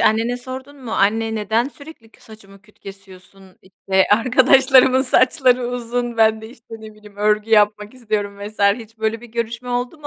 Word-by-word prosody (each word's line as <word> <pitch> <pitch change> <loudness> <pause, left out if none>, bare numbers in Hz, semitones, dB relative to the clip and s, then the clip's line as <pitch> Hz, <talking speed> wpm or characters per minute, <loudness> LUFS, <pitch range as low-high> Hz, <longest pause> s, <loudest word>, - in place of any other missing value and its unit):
annene 225 +3 +1
sordun 260 +3 -10
mu? 225 - -6
Anne, 220 +3 0
neden 220 +4 -1
sürekli 285 -6 -15
kü - - -25
saçımı 200 -3 -17
küt 210 0 -26
kesiyorsun? 195 -1 -15
İşte 190 0 -1
arkadaşlarımın 260 +2 +4
saçları 255 -1 +2
uzun? 240 0 -4
Ben 220 -1 +2
de, 220 - -9
işte, 230 -2 -14
ne 220 -1 -12
bileyim, 210 -1 -18
örgü 210 +1 0
yapmak 210 0 +2
istiyorum 210 -5 -4
vs. 205 +1 -9 0.2
Hiç 225 -1 -13
böyle 220 +1 -2
bir 240 - -12
görüşme 235 +1 -5
oldu 245 +5 -3
mu 295 - -10
225 Hz, 175 wpm, -19 LUFS, 210-245 Hz, 0.2 s, arkadaşlarımın